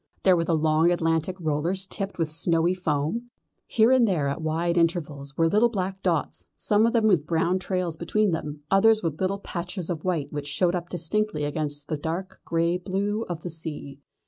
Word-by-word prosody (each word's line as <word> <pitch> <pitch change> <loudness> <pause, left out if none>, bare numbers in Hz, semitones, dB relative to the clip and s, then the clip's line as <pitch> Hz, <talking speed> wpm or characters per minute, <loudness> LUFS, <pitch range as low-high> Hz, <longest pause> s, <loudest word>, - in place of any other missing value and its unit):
There 185 -2 +6
were 165 - +1
the 165 -1 +2
long 155 +2 +3
Atlantic 165 0 0
rollers 165 +4 -1
tipped 195 +1 -4
with 165 -3 -1
snowy 165 +1 +2
foam. 180 +7 -2 0.4
Here 225 +2 +4
and 255 -3 +5
there 165 -8 +1
at 140 - -3
wide 165 +2 0
intervals 155 -5 -1
were 165 - +4
little 215 +7 +4
black 190 -3 -3
dots, 165 -6 -1
some 210 +2 +3
of 230 - 0
them 230 -2 +3
with 175 -8 +3
brown 170 +2 +1
trails 180 -3 -2
behind 200 +3 +1
them, 150 -2 -4
others 215 +2 +5
with 160 -1 -2
little 190 +1 +1
patches 180 -1 -5
of 160 -3 -4
white 170 -7 -1
which 145 -1 -4
showed 175 +4 +1
up 175 -1 -3
distinctly 180 0 -1
against 145 -1 -3
the 155 - -2
dark 165 +5 -5
grey 170 +1 +1
blue 200 +4 -2
of 170 -2 -4
the 175 - -5
sea. 150 -4 -7
170 Hz, 195 wpm, -25 LUFS, 155-190 Hz, 0.4 s, There